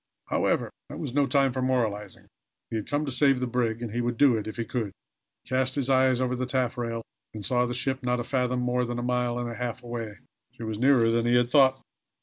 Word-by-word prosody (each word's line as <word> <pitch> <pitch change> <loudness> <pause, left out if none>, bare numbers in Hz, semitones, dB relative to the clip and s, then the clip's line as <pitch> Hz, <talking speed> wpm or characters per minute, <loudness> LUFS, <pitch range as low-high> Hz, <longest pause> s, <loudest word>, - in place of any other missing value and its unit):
However, - - +1 0.2
that - - -7
was - - -5
no 140 0 +3
time 135 -1 +2
for 130 - -2
moralizing. 110 -6 -1 0.5
He - - -2
had 110 - -3
come 145 +1 0
to 140 - -3
save 135 +1 +3
the 125 - 0
brig, 120 -2 -1
and 115 - -4
he 120 +2 -1
would 120 -1 -2
do 135 -3 +5
it 110 -1 -3
if 110 - -6
he 115 - -2
could. 110 -3 -3 0.5
He - - -18
cast 130 0 +1
his 135 -2 0
eyes 130 -1 +4
over 125 0 0
the 130 0 -2
taffrail, 120 -3 -1 0.3
and 105 -2 -2
saw 125 +3 +2
the 120 - -3
ship 135 +1 -1
not 125 -1 0
a - - -1
fathom 125 0 0
more 125 0 +1
than 120 0 -3
a 120 - -3
mile 125 -1 0
and 120 0 -2
a 120 - -5
half 125 0 -4
away. 115 -3 -5 0.4
She - - -10
was 110 -1 -4
nearer 125 -3 +4
than 115 0 +1
he 120 - +4
had 120 0 +2
thought. 135 -2 +4
125 Hz, 250 wpm, -27 LUFS, 115-130 Hz, 0.5 s, do